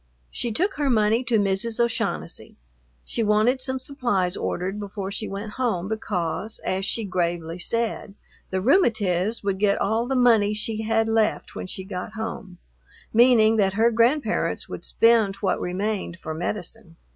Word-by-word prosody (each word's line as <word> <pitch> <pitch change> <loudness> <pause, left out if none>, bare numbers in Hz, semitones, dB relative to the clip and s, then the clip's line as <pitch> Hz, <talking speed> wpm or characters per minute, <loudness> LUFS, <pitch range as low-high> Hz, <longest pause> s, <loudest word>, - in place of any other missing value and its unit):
She 240 - -2
took 370 - 0
her 290 -2 +1
money 220 0 +3
to 235 -3 +2
Mrs. 205 +3 0
O'Shaughnessy. 85 - -2 0.5
She - - -2
wanted 220 +4 +3
some 260 0 -2
supplies 245 -9 -1
ordered 190 +3 -3
before 200 -1 -5
she 215 +1 -4
went 200 +2 -5
home, 195 -8 0
because, 200 -2 -3
as 190 +1 -1
she 225 - 0
gravely 175 -3 -2
said, 225 0 -2 0.3
"the 190 0 -1
rheumatiz 220 - +2
would 195 -1 -1
get 200 -1 +2
all 225 +4 0
the 270 - -1
money 225 -4 +4
she 215 +1 -2
had 225 0 +1
left 225 -1 0
when - - -6
she 190 - -6
got 190 +2 -6
home," 220 -4 -6 0.6
meaning 225 -2 +5
that 195 -2 +2
her 225 +3 +3
grandparents 240 +6 +1
would - - -7
spend 225 -4 +3
what 200 - -1
remained 190 0 -2
for 160 - -5
medicine. 185 +2 -5
215 Hz, 155 wpm, -24 LUFS, 190-230 Hz, 0.6 s, meaning